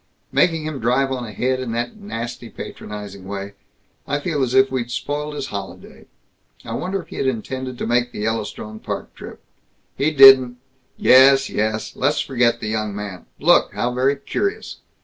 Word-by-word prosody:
Making 165 -3 +2
him 155 -3 -4
drive 130 +4 +1
on 125 -2 -3
ahead 130 +4 -1
in 125 -3 -4
that 120 +1 -3
nasty, 120 - -6
patronizing 100 -3 -8
way 100 0 -6 0.5
I 145 +1 0
feel 150 -2 -2
as 130 -1 0
if 130 0 +5
we'd 125 -2 -2
spoiled 150 +4 -3
his 140 -2 -4
holiday. 100 -1 -8 0.6
I 115 - -5
wonder 185 +8 -3
if - - -24
he - - -9
had 135 - 0
intended 130 +1 -4
to - - -3
make 120 +1 +1
the - - -6
Yellowstone 110 0 -4
Park - - -6
trip? - - -11 0.5
He 145 - +1
didn't 135 -4 +8 0.3
" - - -43
"Yes, 135 +1 +7
yes. 110 +1 -2
Let's 145 +4 +1
forget 120 -3 +1
the 110 - -3
young 110 -1 -2
man. 100 -3 -7
Look! - - +3
How 120 +1 -1
very 130 +3 +2
curious!" 395 - -3
125 Hz, 175 wpm, -21 LUFS, 110-135 Hz, 0.6 s, didn't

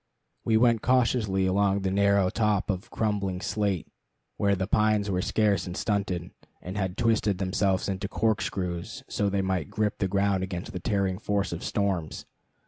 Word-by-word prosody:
We 110 -1 +3
went 115 -1 +4
cautiously 115 -6 +2
along 100 +1 +2
the 95 -1 -1
narrow 100 -1 +3
top 105 -2 +1
of 95 0 -5
crumbling 100 -4 -1
slate, 100 -3 -1 0.5
where 100 -1 +2
the 95 0 -1
pines 105 0 +2
were 90 -1 0
scarce 100 -3 +1
and 90 - -5
stunted, 95 -4 -1 0.3
and 90 +2 -7
had 95 -2 -2
twisted 110 -4 +2
themselves 95 0 0
into 95 0 -2
corkscrews 95 -5 -2
so 100 -1 0
they 100 0 0
might 95 -6 -1
grip 105 -1 -1
the 95 - +1
ground 100 0 +1
against 90 -1 -5
the 90 - -3
tearing 95 -2 0
force 100 -2 -1
of 85 - -6
storms. 95 -6 -2
100 Hz, 165 wpm, -27 LUFS, 95-105 Hz, 0.5 s, went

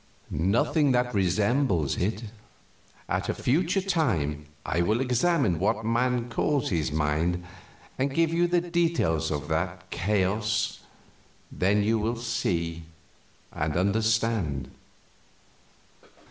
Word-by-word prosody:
"Nothing 120 - +2
that 125 0 +1
resembles 100 - +1
it. 105 +5 -1 0.8
At - - -2
a - - 0
future 170 +8 +1
time 85 - 0 0.2
I 85 - 0
will 110 +7 +1
examine 125 - +1
what 105 +3 0
man 120 +1 +1
calls 135 +2 0
his 80 -4 0
mind 80 +4 0 0.6
and 135 +1 +1
give 165 +3 +1
you 175 +1 +3
the 175 0 +2
details 170 - 0
of 75 -3 -3
that - - -2
chaos, 105 +3 0 0.7
then 100 +3 +2
you 110 +2 +2
will 115 +3 -1
see 85 -8 -2 0.7
and 75 +1 -2
understand. 110 - 0
110 Hz, 110 wpm, -27 LUFS, 85-130 Hz, 0.8 s, you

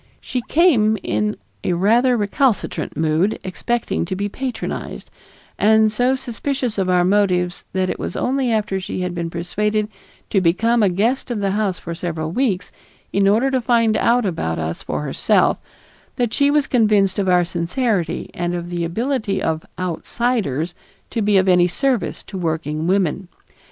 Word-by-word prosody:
She 250 - -3
came 245 -11 +4
in 210 0 0 0.3
rather 225 +8 +3
a - - 0
recalcitrant 220 +3 0
mood, 160 +6 +1
expecting 235 +5 -2
to 190 +2 -3
be 200 +2 -2
patronized, 255 +4 -5 0.5
and 220 0 +4
so 245 +4 +2
suspicious 255 -2 -3
of 185 -1 0
our 180 -1 +4
motives 180 -2 +1
that 185 0 +1
it - - -3
was - - -4
only 260 -1 0
after 210 -3 0
she 185 0 -4
had 180 -1 -2
been 170 -1 -3
persuaded 210 +5 -1 0.4
to 195 - +3
become 225 +7 +2
a 205 - +4
guest 225 +10 0
of 235 -3 -2
the 200 -1 0
house 200 -3 0
for 170 - -6
several 160 -2 -3
weeks 200 -5 -1 0.4
in 195 0 +3
order 230 +7 +3
to 260 -1 +1
find 230 -2 +2
out 240 +2 +2
about 80 - -2
us 80 +1 -3
for - - -3
herself, - - +2 0.6
that 240 -2 -1
she 280 +2 +3
was 290 -1 +3
convinced 210 -6 +2
of 190 -2 +1
our 180 -1 +4
sincerity 175 - -1
and 175 0 -2
of 175 0 -5
the 175 -1 -2
ability 215 +3 -1
of 160 0 -1
"outsiders" 180 - -1 0.4
to 230 - -1
be 205 -1 +3
of 190 0 +3
any 180 -1 +5
service 245 0 -1
to 195 - -7
working 160 -2 -2
women. 190 -1 +1
200 Hz, 165 wpm, -20 LUFS, 175-235 Hz, 0.6 s, any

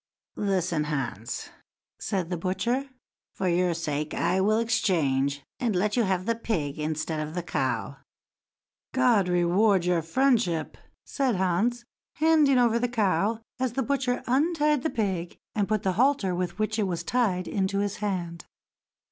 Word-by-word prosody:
"Listen, 180 -6 0
Hans!" 135 -7 -3
then - - -18 0.4
said 185 -5 -2
the 175 - -1
butcher; 215 +10 -1 0.5
"for 190 - -1
your 175 0 +2
sake 150 -2 -3
I 180 +3 +1
will 215 +3 +3
exchange, 145 -11 +1 0.2
and 235 -6 0
let 205 +3 +1
you 245 - +3
have 185 -1 0
the 230 - +2
pig 160 -11 -3
instead 155 +1 -2
of 155 +2 -4
the 175 - -2
cow." 130 -3 -2 1.0
"God 240 -7 +4
reward 180 +2 +3
your 175 -2 +2
friendship!" 215 - +1 0.3
said 265 -5 0
Hans, 200 +7 0 0.3
handing 310 -4 +4
over 235 -1 +3
the 245 +1 0
cow, 215 -1 +1 0.2
as 255 -2 -1
the 265 - 0
butcher 260 -1 -1
untied 300 +2 +2
the 315 - 0
pig, 190 - -2 0.2
and 205 -2 0
put 215 -2 0
the 190 - +1
halter 245 -4 +2
with 180 +1 -3
which 215 +1 -1
it 205 - +1
was 170 -2 -3
tied 195 -6 0
into 195 0 -1
his 205 0 -1
hand. 175 -5 -3
195 Hz, 155 wpm, -27 LUFS, 170-235 Hz, 1.0 s, God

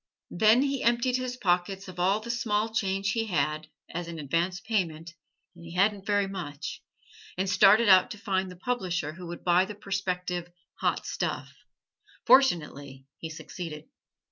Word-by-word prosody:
Then 220 +7 +5
he 275 -2 -1
emptied 240 +2 +2
his 255 -1 -4
pockets 190 -1 0
of 180 -1 -9
all 195 +4 +2
the 235 +2 -4
small 220 -2 0
change 195 -1 0
he 225 -1 -1
had, 155 -5 -1 0.3
as 175 0 -4
an 170 -1 -6
advance 170 +5 -1
payment, 170 -7 -2 0.4
and 170 - -14
he 170 +1 -9
hadn't 200 +1 +1
very 205 -1 +2
much, 155 -6 -6 0.6
and 190 +1 0
started 210 +3 +6
out 185 -2 +7
to 220 - -7
find 190 -3 -1
the 180 - -10
publisher 180 -7 -2
who 175 +1 -9
would 170 0 -8
buy 180 +1 +4
the 210 +1 -8
prospective 180 -3 -3 0.3
"hot - - 0
stuff." - - -3 0.7
Fortunately 145 - +3
he 160 - -6
succeeded. 160 -1 -8
190 Hz, 160 wpm, -28 LUFS, 170-210 Hz, 0.7 s, out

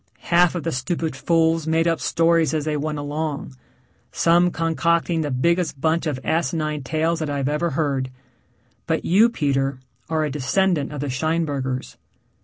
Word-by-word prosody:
Half 175 +1 +5
of 170 - -3
the 165 - -1
stupid 155 +3 -2
fools 160 +3 +1
made 165 +1 +2
up 165 -1 +1
stories 165 -1 +2
as 155 -1 -1
they 155 -1 -1
went 150 +1 -2
along 145 -1 -4 0.6
some 175 +1 +3
concocting 165 0 0
the 150 - -2
biggest 165 +3 0
bunch 160 +3 +1
of 140 -4 -2
asinine 155 -2 -1
tales 160 +5 0
that 155 -2 -2
I've 140 -2 -1
ever 150 +4 0
heard. 140 -4 -1 0.8
But - - -1
you, 210 +7 +5
Peter, 135 - -1 0.3
are 160 -1 +1
a 150 - -2
descendant 150 +2 0
of 145 -2 -5
the 145 - -2
Scheinbergers. 140 -3 -2
155 Hz, 160 wpm, -22 LUFS, 145-165 Hz, 0.8 s, Half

